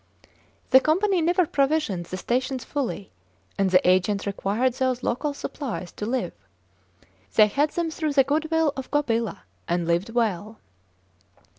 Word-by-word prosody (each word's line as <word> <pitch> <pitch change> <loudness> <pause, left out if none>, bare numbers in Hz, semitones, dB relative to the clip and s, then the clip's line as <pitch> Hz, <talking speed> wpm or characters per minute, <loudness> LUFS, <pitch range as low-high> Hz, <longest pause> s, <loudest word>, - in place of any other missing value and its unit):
The 260 - +9
Company 360 +6 +2
never 350 +2 +3
provisions 275 - 0
the 185 - -4
stations 255 +4 -2
fully, 255 -8 -4 0.4
and 195 -1 +1
the 180 -1 +4
agents 185 +2 +2
required 205 +5 0
those 255 -1 -1
local 290 +5 -1
supplies 245 - -5
to 210 - -6
live. 240 -7 -2 1.0
They 215 - +8
had 280 +8 +1
them 335 0 -2
through 310 -2 -2
the 275 -1 +5
good 305 +4 -1
will 320 -3 +2
of 265 -1 -6
Gobila, 230 -8 0 0.3
and 175 0 0
lived 170 +5 0
well. 220 -2 -1
255 Hz, 145 wpm, -25 LUFS, 200-295 Hz, 1.0 s, The